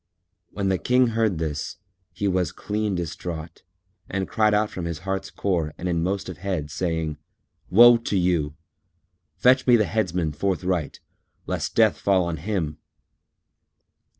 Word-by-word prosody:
When 100 -2 -2
the 95 -2 +1
King 125 -1 +3
heard 110 -5 +1
this, 75 -2 -3 0.3
he 100 - -2
was 90 -4 +1
clean 105 -1 -2
distraught 85 -1 -5 0.5
and 95 -1 -2
cried 110 -1 +2
out 105 0 +1
from 90 - -5
his 85 -1 -4
heart's 95 0 -2
core 85 -8 -1
and 90 - -4
in 85 -2 0
most 95 +3 -1
of 90 -3 -7
head, 90 -6 -3
saying, 80 -3 -2 0.5
"Woe 120 +4 +8
to 115 -3 -2
you! 85 -5 +1 0.8
Fetch 130 +1 +4
me 125 - +7
the 110 -2 +3
Headsman 90 -8 -1
forthright, 90 0 -2 0.4
lest - - -3
death - - +4
fall 95 -2 +3
on 85 -1 -3
him!" 80 -4 -3
95 Hz, 150 wpm, -24 LUFS, 80-105 Hz, 0.8 s, Woe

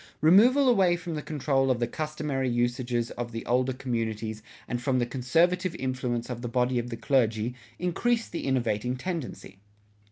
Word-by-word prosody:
Removal 240 - +6
away 190 -8 +4
from 175 -1 -5
the 150 - -3
control 140 -3 0
of 125 -2 +2
the 120 - +2
customary 150 -3 -2
usages 120 0 0
of 120 -1 -5
the 115 0 -6
older 125 +2 +2
communities 115 -4 -3 0.3
and 120 - -3
from 130 +1 +1
the 120 - +2
conservative 165 +9 +1
influence 130 -3 -2
of 120 -2 -5
the 120 - -3
body 125 +1 +1
of 120 +1 -4
the 115 - -5
clergy, 115 -2 +1 0.2
increased 230 +7 0
the 170 - -4
innovating 125 -2 0
tendency. 160 - -5
130 Hz, 165 wpm, -27 LUFS, 120-155 Hz, 0.3 s, Removal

